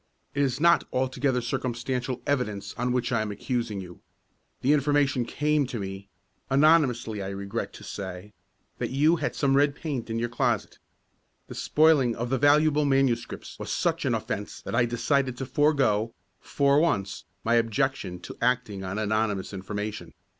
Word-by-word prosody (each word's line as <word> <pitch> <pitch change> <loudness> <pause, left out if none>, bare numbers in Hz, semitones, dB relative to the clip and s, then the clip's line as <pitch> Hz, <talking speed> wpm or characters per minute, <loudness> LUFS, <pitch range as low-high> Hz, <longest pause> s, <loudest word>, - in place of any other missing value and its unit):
It 140 - 0
is 135 -2 0
not 170 +2 +5
altogether 130 0 0
circumstantial 125 0 -3
evidence 105 -8 -1
on 125 +1 -1
which 125 0 0
I 115 -2 +2
am 110 -1 -3
accusing 110 -1 -3
you. 90 -1 -11 0.6
The 140 +4 +4
information 145 -3 +2
came 150 +1 +1
to 120 - -5
me 95 0 -6 0.4
anonymously 135 -7 +3
I 95 - -4
regret 100 0 -4
to - - -11
say 95 +1 -7 0.5
that - - -2
you 150 +6 +3
had - - -2
some 135 -2 +2
red 140 0 +3
paint 140 -8 -4
in 115 - -2
your 120 +1 0
closet. 120 -3 -1 0.7
The - - -9
spoiling 150 -6 +3
of 120 +2 -4
the 130 - +1
valuable 150 +1 +4
manuscripts 135 -4 0
was - - -5
such - - 0
an - - +1
offence - - -4
that - - -6
I 120 - +3
decided 125 +2 0
to 135 - -4
forego, 130 -6 +2 0.2
for 140 0 +2
once, 105 - 0 0.2
my 115 - +1
objection 115 -4 0
to - - -8
acting 120 -5 0
on 95 +2 -4
anonymous 110 -2 -1
information. 105 -3 -5
125 Hz, 160 wpm, -27 LUFS, 105-140 Hz, 0.7 s, not